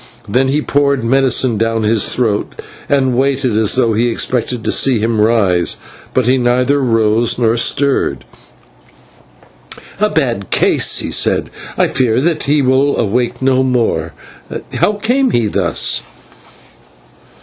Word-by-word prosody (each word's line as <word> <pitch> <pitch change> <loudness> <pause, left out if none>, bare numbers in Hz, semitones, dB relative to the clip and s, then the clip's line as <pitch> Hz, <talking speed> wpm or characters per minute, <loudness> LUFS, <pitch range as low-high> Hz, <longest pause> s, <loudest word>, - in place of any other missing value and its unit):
Then 130 +6 +1
he 145 +3 0
poured 140 -3 0
medicine 130 -2 +1
down 115 0 -1
his 110 -1 +1
throat, 110 -5 -2 0.3
and 130 -3 +1
waited 135 -2 0
as 110 +1 +2
though 120 -3 +1
he 115 +3 +1
expected 120 0 -2
to - - -1
see 130 -3 +2
him 110 0 0
rise, 100 -6 +1 0.4
but 130 - +2
he 130 +2 +2
neither 125 +3 +1
rose 115 -1 +1
nor 115 -2 +1
stirred. 135 +4 0 1.7
"A 210 +1 +2
bad 120 - -2
case," - - +2
he - - -5
said. - - 0 0.3
"I - - +2
fear 125 -2 0
that 160 +2 -1
he 145 0 +1
will 130 +2 +1
awake 120 +4 -1
no 130 0 +2
more. 125 -3 -1 0.6
How 210 - +1
came 245 +6 0
he 120 -2 0
thus?" 105 - 0
125 Hz, 140 wpm, -14 LUFS, 115-135 Hz, 1.7 s, as